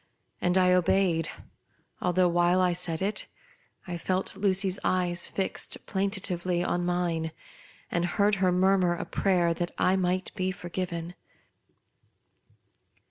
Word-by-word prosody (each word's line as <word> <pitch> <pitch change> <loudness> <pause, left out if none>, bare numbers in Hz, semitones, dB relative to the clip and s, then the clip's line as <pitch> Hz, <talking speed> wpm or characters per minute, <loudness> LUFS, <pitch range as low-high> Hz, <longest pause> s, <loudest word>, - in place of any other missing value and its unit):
And 180 +1 +2
I 180 -1 +4
obeyed, 180 -2 +2 0.7
although, 180 0 +2
while 175 +1 +3
I 180 -1 +3
said 170 -1 -1
it, 205 +2 -2 0.6
I 175 -1 -5
felt 185 +3 0
Lucy's 195 -1 +2
eyes 175 -1 +2
fixed 195 - -3
plaintively 185 -3 -1
on 175 0 -1
mine, 175 -2 -1 0.6
and 175 0 0
heard 200 +5 +1
her 185 -1 +3
mur 190 +2 +3
mur 175 -1 +2
a - - -5
prayer 175 -3 +1
that 175 +1 -3
I 185 - +3
might 185 0 -1
be 185 -2 -1
forgiven. 175 -1 -5
180 Hz, 130 wpm, -27 LUFS, 175-190 Hz, 0.7 s, I